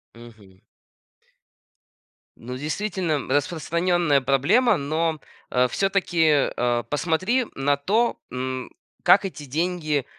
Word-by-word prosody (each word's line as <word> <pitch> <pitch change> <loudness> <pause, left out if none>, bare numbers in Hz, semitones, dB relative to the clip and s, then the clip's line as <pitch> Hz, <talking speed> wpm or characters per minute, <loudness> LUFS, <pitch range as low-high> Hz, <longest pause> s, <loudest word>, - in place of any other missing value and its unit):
Мгм. 110 -5 -16 1.8
Ну, 125 +2 -7
действительно, 165 0 -2
распространенная 170 0 +1
проблема, 185 - +3
но, 155 +2 -1 0.3
э, 125 0 +3
всё-таки, 170 -5 +2
э, 120 -1 0
посмотри 185 - 0
на 140 +1 +1
то, 210 +12 0
м, 130 0 -4 0.3
как - - +5
эти 165 -6 -6
деньги, 155 -1 -1
155 Hz, 95 wpm, -23 LUFS, 130-180 Hz, 1.8 s, как